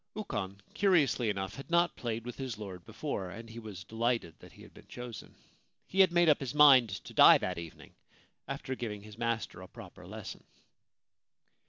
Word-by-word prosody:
Ukon, 105 - -4
curiously 155 - +3
enough, 95 -2 -3
had 135 - -9
not 170 +1 +2
played 115 -1 -4
with 125 - -6
his 130 -5 -5
lord 95 -4 -8
before, 95 -2 -4
and 115 +5 -9
he 115 +1 -9
was 105 -5 -9
delighted 115 -6 -1
that - - -15
he - - -15
had - - -16
been - - -16
chosen. 120 -2 -9 0.5
He 190 - -4
had 190 -2 +7
made 175 0 +4
up 150 - +5
his 135 0 -5
mind 135 -6 +7
to 95 - -8
die - - +8
that - - -3
evening 85 -2 -11 0.5
after 130 - -4
giving 105 -5 -5
his 105 +1 -13
master 115 -6 -2
a 95 - -10
proper - - -12
lesson. - - -8
115 Hz, 185 wpm, -31 LUFS, 100-135 Hz, 0.5 s, die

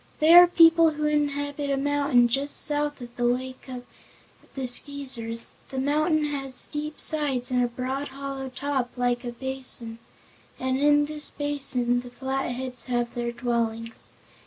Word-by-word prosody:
They 315 +2 +5
are 355 0 +10
people 330 -1 +6
who 300 0 -3
inhabit 285 -1 -1
a 275 - 0
mountain 280 -3 +2
just 275 +4 0
south 295 -2 -1
of 240 -1 -10
the 245 - -2
Lake 255 +2 -2
of 250 -1 -7 0.7
the 265 -2 -3
Skeezers. 245 -3 -1
The 265 - -7
mountain 300 +3 +1
has 275 -3 -4
steep 300 +3 -2
sides 275 -5 +2
and 250 -1 +2
a - - +1
broad, 260 +4 -4
hollow 275 -1 -6
top, 260 -1 -3
like 245 0 0
a 240 - -4
basin, 250 -2 -4 0.6
and 260 0 -1
in 290 0 +4
this 300 0 +3
basin 265 -4 -1
the 245 - -11
Flatheads 260 -1 -4
have 240 -1 -2
their 240 0 -3
dwellings. 230 -1 -3
265 Hz, 155 wpm, -25 LUFS, 245-290 Hz, 0.7 s, are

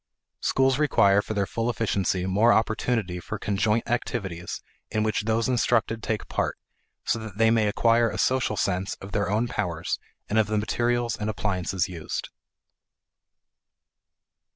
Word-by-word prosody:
Schools 135 0 +2
require 100 -9 +4
for 110 - -5
their 100 -1 +1
full 115 +4 -2
efficiency 100 -6 0
more 105 +5 +4
opportunity 110 -5 +1
for 105 +5 -5
conjoint 105 +2 0
activities 95 -7 -3 0.3
in 110 - 0
which 110 -1 0
those 115 +1 +1
instructed 115 -2 +1
take 110 -1 -2
part, - - -1 0.5
so 115 - +1
that 110 -3 -8
they 115 0 +4
may 110 -2 +3
acquire 115 +2 +3
a - - -5
social 130 -5 +1
sense 95 0 -1
of 95 - -10
their 100 -2 0
own 110 +4 +1
powers 90 -8 -2 0.3
and 110 - +2
of 110 - +3
the 110 0 0
materials 120 +2 0
and 105 +1 -3
appliances 95 -4 -1
used. 85 -4 -5
110 Hz, 150 wpm, -26 LUFS, 100-115 Hz, 0.5 s, require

